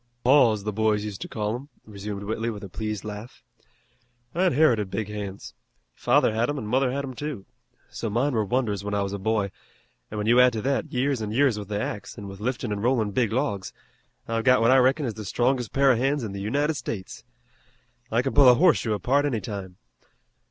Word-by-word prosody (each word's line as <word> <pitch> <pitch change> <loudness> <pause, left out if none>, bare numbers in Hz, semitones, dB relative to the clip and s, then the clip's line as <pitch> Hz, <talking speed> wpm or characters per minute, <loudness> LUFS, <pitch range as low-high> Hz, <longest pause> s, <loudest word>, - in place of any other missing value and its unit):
"Paws, 120 -5 +4
the 105 0 -3
boys 105 0 +1
used 105 -3 -6
to - - -4
call 105 -1 -2
'em," 135 +4 -7 0.2
resumed 100 -1 -6
Whitley 110 +2 -2
with 105 -3 -6
a 100 - -7
pleased 110 +1 -4
laugh. 105 +3 -8 0.9
"I 180 +3 +1
inherited 130 - +3
big 105 +2 -3
hands. 100 -2 -6 0.4
Father 110 - +2
had 115 +4 0
em 145 - -2
an' 130 - -4
mother 125 +4 +1
had 140 +2 -2
'em, 130 - -7
too. 140 -6 -6 0.5
So 115 - -4
mine 125 +7 0
were 110 -2 +1
wonders 105 -3 -1
when 105 0 -2
I 100 - +1
was 100 0 -4
a 100 - -4
boy, 105 -1 0 0.6
an' 105 - -6
when 105 - -2
you 120 +3 +5
add 125 -1 +6
to 110 - -3
that 140 +1 -1
years 130 -1 0
an' 105 - -3
years 125 -2 +2
with 100 - -7
the 105 0 -2
axe, 105 -1 -5
an' 100 - -7
with 95 0 -9
liftin' 120 0 -2
an' 105 - -2
rollin' 115 -2 +1
big 115 0 +1
logs 110 -6 -2 0.5
I've 115 0 -1
got 125 +1 +5
what 115 +2 +4
I 130 - +6
reckon 130 +3 +3
is 115 - -2
the 110 0 -7
strongest 120 +3 0
pair 135 0 +4
of 120 - +1
hands 135 +1 0
in 110 - -4
the 100 0 -6
United 145 +9 0
States. 110 -6 -6 0.9
I 115 +2 +1
can 135 - -2
pull 140 -3 +7
a 125 - +7
horseshoe 150 -8 +3
apart 135 +7 +1
any 125 -6 0
time. 95 -2 -7
115 Hz, 220 wpm, -25 LUFS, 105-130 Hz, 0.9 s, pull